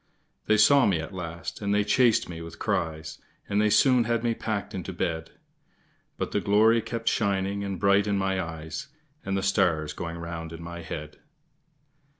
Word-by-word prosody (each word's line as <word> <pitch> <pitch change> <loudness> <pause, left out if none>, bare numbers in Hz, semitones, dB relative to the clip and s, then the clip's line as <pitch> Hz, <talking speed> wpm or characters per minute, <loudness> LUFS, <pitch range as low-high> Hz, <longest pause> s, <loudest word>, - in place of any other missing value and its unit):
They 110 - +4
saw 140 +6 +6
me 95 -5 +2
at 80 +5 -6
last, 85 0 -6
and 100 0 0
they 105 - +3
chased 120 +2 +3
me 85 -1 -7
with 85 0 -9
cries, 80 -1 -2 0.3
And 100 +1 +1
they 105 - +3
soon 125 +1 +4
had 115 0 0
me 120 -1 +1
packed 110 -2 -3
into 95 0 -5
bed; 80 -2 -3 0.9
But - - -3
the 105 - 0
glory 110 +3 +4
kept 115 0 -5
shining 100 -1 0
and 100 -2 -4
bright 100 +1 +3
in 100 -1 +1
my 95 -1 0
eyes, 80 - -6 0.4
And 95 0 -1
the 95 - -2
stars 90 -6 +1
going 85 0 -5
round 85 -1 -6
in 80 0 -8
my 85 0 -7
head. 75 -2 -7
95 Hz, 180 wpm, -27 LUFS, 85-105 Hz, 0.9 s, saw